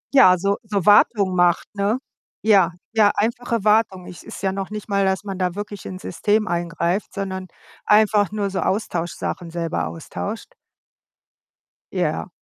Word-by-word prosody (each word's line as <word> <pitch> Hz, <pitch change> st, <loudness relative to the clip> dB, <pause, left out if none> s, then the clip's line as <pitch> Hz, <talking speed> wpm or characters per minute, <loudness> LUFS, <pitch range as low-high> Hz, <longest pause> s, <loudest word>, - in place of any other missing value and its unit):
Ja, 185 Hz, -9 st, +7 dB
so 200 Hz, +3 st, 0 dB
so 205 Hz, -4 st, -2 dB
Wartung 205 Hz, -2 st, +5 dB
macht, 175 Hz, +1 st, +2 dB
ne? 205 Hz, +3 st, 0 dB, 0.5 s
Ja, 195 Hz, -6 st, +4 dB, 0.2 s
ja, 215 Hz, -2 st, +5 dB
einfache 230 Hz, 0 st, -1 dB
Wartung. 210 Hz, -4 st, +2 dB
Es 180 Hz, -, -10 dB
ist -, -, -10 dB
ja 190 Hz, -, +1 dB
noch 195 Hz, 0 st, -4 dB
nicht 210 Hz, 0 st, -7 dB
mal, 200 Hz, -1 st, +1 dB
dass 190 Hz, +1 st, 0 dB
man 195 Hz, -2 st, -6 dB
da 180 Hz, -1 st, -1 dB
wirklich 205 Hz, -1 st, -6 dB
ins 185 Hz, 0 st, -8 dB
System 210 Hz, +5 st, 0 dB
eingreift, 175 Hz, +2 st, -1 dB
sondern 190 Hz, -1 st, -4 dB, 0.4 s
einfach 210 Hz, -2 st, +4 dB
nur 205 Hz, -2 st, -2 dB
so 190 Hz, -, -2 dB
Austauschsachen 175 Hz, -2 st, -2 dB
selber 165 Hz, 0 st, -2 dB
austauscht. 210 Hz, -, -6 dB, 1.4 s
Ja. -, -, -1 dB
200 Hz, 150 wpm, -22 LUFS, 180-210 Hz, 1.4 s, Ja